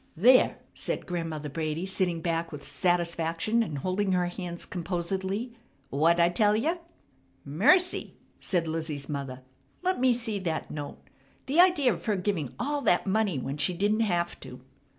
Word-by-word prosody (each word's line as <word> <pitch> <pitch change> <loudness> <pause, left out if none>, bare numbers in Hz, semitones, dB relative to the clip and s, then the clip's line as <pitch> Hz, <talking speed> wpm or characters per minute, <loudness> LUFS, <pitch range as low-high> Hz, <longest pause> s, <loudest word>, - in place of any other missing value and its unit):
"There!" 250 +8 +5 0.2
said - - -3
Grandmother 165 -4 -3
Brady 155 +3 -3
sitting 185 -3 -1
back 165 -1 -1
with 145 -2 -8
satisfaction 175 +4 0
and 160 -10 -2
holding 185 +5 0
her 180 -1 +2
hands 175 -1 -6
composedly, 190 +6 -3 0.4
"Whadd' 165 +4 +3
I 170 0 +5
tell 210 +4 +3
ya?" 315 +11 0 0.7
"Mercy!" 290 - +3 0.2
said 175 -3 0
Lizzie's 155 -3 -3
mother, 135 -3 -5 0.4
"Let 370 -4 +1
me 260 -1 +5
see 225 -4 -3
that 165 -4 -3
note! 145 -2 -7 0.4
The 285 +5 +1
idea 350 -8 +5
of - - -9
her 215 -3 +1
giving 180 - -2
all 285 +3 -1
that 180 - +3
money 200 -4 +1
when 135 +2 -4
she 175 +5 +1
didn't 205 +4 +1
have 175 -6 0
to!" - - -10
180 Hz, 155 wpm, -28 LUFS, 165-215 Hz, 0.7 s, There